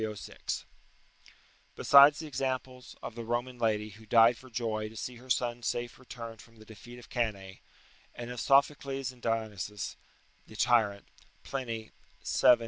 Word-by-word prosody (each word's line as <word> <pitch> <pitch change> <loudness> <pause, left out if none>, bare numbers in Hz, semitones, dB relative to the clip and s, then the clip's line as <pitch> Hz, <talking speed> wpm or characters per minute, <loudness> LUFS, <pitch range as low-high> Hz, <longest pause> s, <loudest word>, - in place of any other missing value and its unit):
306.] 110 -1 -4 1.1
Besides 140 +1 +8
the 160 - -6
examples 130 -2 -4
of - - -5
the 115 0 -6
Roman 120 +2 -2
lady, 110 -2 +1
who 110 +2 -15
died 115 +2 +6
for 130 +2 -14
joy 110 -2 -2
to 110 - -14
see 125 +2 -5
her 130 +2 -15
son 120 -1 0
safe 120 +1 -3
returned 115 -3 -9
from 115 - -19
the 110 -1 -15
defeat 115 +3 -12
of 120 - -13
Cannae; 100 -6 -3 0.5
and 120 0 -6
of 125 - -5
Sophocles 135 -1 +2
and 125 -2 -19
of 115 - +2
Dionysius 105 -2 -4 0.5
the 110 - -13
Tyrant, 105 -3 +2 0.4
[Pliny, 115 -5 -4 0.3
vii. 125 - +6
120 Hz, 155 wpm, -31 LUFS, 110-125 Hz, 1.1 s, Besides